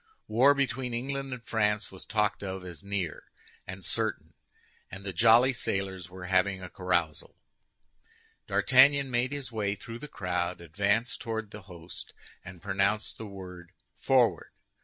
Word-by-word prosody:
War 130 +6 +5
between 130 -3 -1
England 135 +2 -3
and 125 -2 -6
France 105 -2 0
was 95 - -10
talked 105 -1 +1
of 95 -2 -5
as 90 +1 -8
near 100 -6 -3 0.4
and 95 0 -7
certain, - - -2 0.6
and 95 +2 -9
the 95 - -3
jolly 115 +7 +6
sailors 95 -6 -3
were 90 0 -9
having 95 +1 +2
a 90 -2 -8
carousal. 85 -5 -1 1.1
D'Artagnan 135 +1 +5
made 120 +2 +1
his 140 -5 -5
way 105 -3 -1
through 115 +3 -9
the 150 - -8
crowd, 90 -7 -2
advanced 100 +8 0
toward 110 -2 -4
the 105 - -9
host, 85 -1 -9 0.3
and 90 -2 -11
pronounced 100 +2 0
the 110 - -6
word 90 -3 -10 0.3
"Forward!" - - +3
100 Hz, 145 wpm, -29 LUFS, 90-120 Hz, 1.1 s, jolly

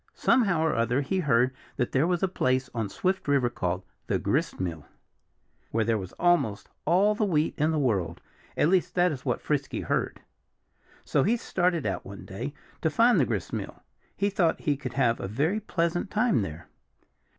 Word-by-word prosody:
Somehow 195 -10 +3
or 160 - +2
other 120 +4 +1
he 185 +7 -1
heard 130 -5 +3 0.2
that 125 - -1
there 135 +5 +2
was 180 0 0
a - - +4
place 130 -7 0
on 110 -4 -2
Swift 185 - -1
River 135 -4 +2
called 90 -2 -2 0.2
the - - +1
gristmill, 85 -5 -2 0.8
where 110 -1 0
there 115 -1 +1
was 95 -2 -7
almost 175 -13 +1 0.2
all 200 +5 +4
the 215 - -1
wheat 160 -6 +1
in 150 +1 +1
the 160 - 0
world 100 - 0 0.4
at 150 - +3
least 185 -1 +1
that 180 -1 +4
is 135 -4 -6
what - - 0
Frisky - - -1
heard. - - -2 0.8
So 145 - +2
he 225 - +2
started 175 - 0
out, 95 - -2
one 100 0 -10
day, 120 +9 -6 0.3
to 160 - +2
find 230 +4 +4
the 130 - +3
gristmill. 105 -6 -4 0.3
He 200 +1 +1
thought 175 -4 +1
he 145 - +1
could 130 -2 -6
have 120 -4 +2
a - - -4
very 150 - 0
pleasant 175 -2 -1
time 215 - +2
there. 80 -3 -6
145 Hz, 185 wpm, -27 LUFS, 115-180 Hz, 0.8 s, a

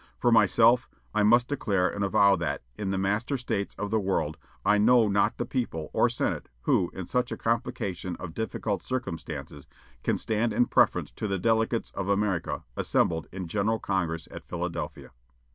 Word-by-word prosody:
For 120 - +2
myself, 115 +1 +5 0.2
I 105 - +2
must 120 +4 +5
declare 100 -10 +1
and 100 +3 -3
avow 100 +1 +5
that, 85 -6 -2
in 100 +5 -3
the 95 - 0
master 105 +8 0
states 100 -5 -3
of 105 0 -4
the 110 - +2
world, 95 -6 -1 0.3
I 105 0 +4
know 115 +1 +5
not 100 0 +2
the 120 - -2
people, 115 - -3
or - - +4
senate, - - -2
who, 85 - +2
in 95 - -5
such 125 +4 -1
a - - -3
complication 100 -6 -2
of 85 -2 -8
difficult 110 -1 -2
circumstances, 80 - -5 0.3
can - - 0
stand 110 +1 0
in 120 - +3
preference - - +2
to 110 - -4
the 100 -1 -1
delegates 115 +3 +1
of 100 0 -4
America 100 -4 0
assembled 80 -1 +1
in 95 -1 -5
General 105 +5 0
Congress 85 -6 -2
at - - -8
Philadelphia." 85 -1 -5
100 Hz, 175 wpm, -27 LUFS, 90-115 Hz, 0.3 s, myself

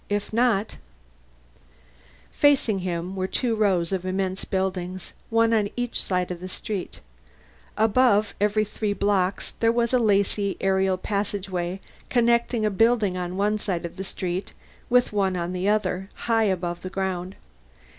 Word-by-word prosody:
If 205 +1 -2
not 225 -3 +1 1.5
Facing 270 -8 +3
him 180 0 -3
were 185 -1 -1
two 235 +3 0
rows 190 -5 +2
of 190 -2 -1
immense 185 0 -2
buildings, 185 -1 -3 0.2
one 230 0 +3
on 210 -2 +2
each 245 -1 -2
side 180 -1 -1
of 175 - -5
the 185 - -6
street. 195 0 -5 0.8
Above 215 -1 +3
every 210 +1 +2
three 210 0 -2
blocks 200 -2 0
there 230 0 +4
was 235 +1 0
a 250 - +5
lacy 200 -2 +1
aerial 190 -1 +2
passageway 190 -2 -3 0.3
connecting 235 -1 +2
a 210 - +1
building 220 -2 +3
on 180 0 -4
one 210 +2 +1
side 180 -5 -2
of 170 - -7
the 190 - -4
street 185 0 -4 0.4
with 245 -2 +3
one 190 -3 +1
on 175 +1 -3
the 185 +2 0
other, 195 -2 0
high 225 -1 +2
above 175 -3 -1
the 185 - -5
ground. 190 -1 -3
195 Hz, 150 wpm, -25 LUFS, 185-220 Hz, 1.5 s, a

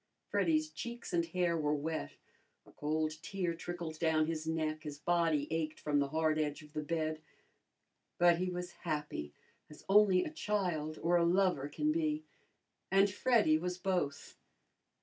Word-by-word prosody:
Freddy's 160 -6 +1
cheeks 235 +7 -6
and 170 -1 +2
hair 175 0 +1
were 150 -2 +1
wet, 150 - -3 0.5
a - - -17
cold 155 +1 -2
tear 180 -1 -2
trickled 165 -2 -6
down 160 -2 +3
his 160 0 -3
neck, 155 -1 -1
his 150 -2 -6
body 165 -2 +1
ached 155 -1 -2
from 145 -1 +1
the 140 - +1
hard 155 +1 +1
edge 150 0 -2
of 150 0 -16
the 155 - -2
bed; 155 0 -2 1.0
but 175 -1 +5
he 185 0 0
was 180 0 -4
happy, 150 - -3 0.4
as 150 - -14
only 195 -2 +5
a - - -5
child 180 - -1
or 175 +1 +4
a 170 - +3
lover 175 -5 +2
can 300 - 0
be, 310 -1 0 0.7
and 195 +1 +4
Freddy 210 -10 +3
was 180 +1 -3
both. 180 -6 -2
165 Hz, 160 wpm, -34 LUFS, 155-180 Hz, 1.0 s, but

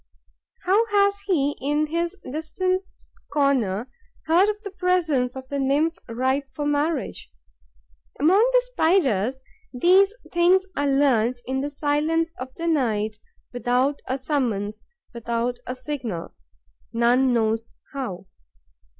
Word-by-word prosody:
How 410 +5 +3
has 400 -1 +2
he, 290 -6 +1
in 295 +3 +1
his 340 +4 -2
distant 370 +6 -2 0.5
corner, 255 -7 +1 0.4
heard 350 +6 +4
of 420 0 -2
the 400 - -6
presence 330 -9 +1
of 260 0 -8
the 280 - -2
nymph 290 +5 +1
ripe 260 +4 -1
for 295 +1 -5
marriage? 290 - -1 0.9
Among 340 +8 +5
the - - +4
Spiders, 265 - +2 0.3
these 370 +9 +4 0.2
things 360 +2 +4
are 285 0 0
learnt 255 -4 +2
in 265 +1 -1
the 285 - -2
silence 305 +3 0
of 260 0 -6
the 335 - -5
night, 220 -9 0 0.3
without 250 +3 0
a 260 - -1
summons, 225 -7 -2 0.3
without 235 +1 -2
a 250 - -3
signal, 255 - -5 0.6
none 245 +3 +3
knows 225 -1 0 0.2
how. 235 -10 -5
280 Hz, 125 wpm, -24 LUFS, 245-335 Hz, 0.9 s, Among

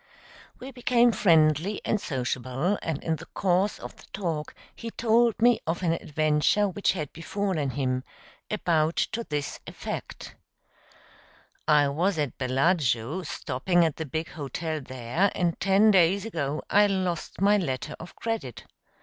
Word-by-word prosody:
We 260 +2 -8
became 245 -1 +3
friendly 165 0 +3
and 210 - 0
sociable, 130 +6 -2
and 160 -3 -3
in 160 -1 0
the - - -11
course 190 +2 +1
of - - -10
the - - -16
talk 165 -6 -3 0.2
he 230 - -6
told 230 0 +2
me 240 0 +5
of 170 +3 -2
an 170 - +2
adventure 155 +5 +1
which 200 +1 0
had 155 -6 -5
befallen 170 -3 -2
him 130 -1 -1 0.5
about 165 -6 +1 0.2
to 235 +1 -3
this 145 - -4
effect: - - -7 1.3
"I 150 -2 +5
was 170 +6 0
at 145 -5 -1
Bellagio, 135 +1 +1
stopping 175 +2 0
at 160 - -2
the 160 - -4
big 160 +4 -3
hotel 155 +1 -4
there, 130 +9 -1
and 175 -2 0
ten 195 +3 +5
days 190 +1 +4
ago 155 -8 -3
I 205 +1 +5
lost 185 -5 -2
my 205 +2 +4
letter 150 -4 -3
of 170 +2 -10
credit. 225 - -4
165 Hz, 145 wpm, -27 LUFS, 145-200 Hz, 1.3 s, me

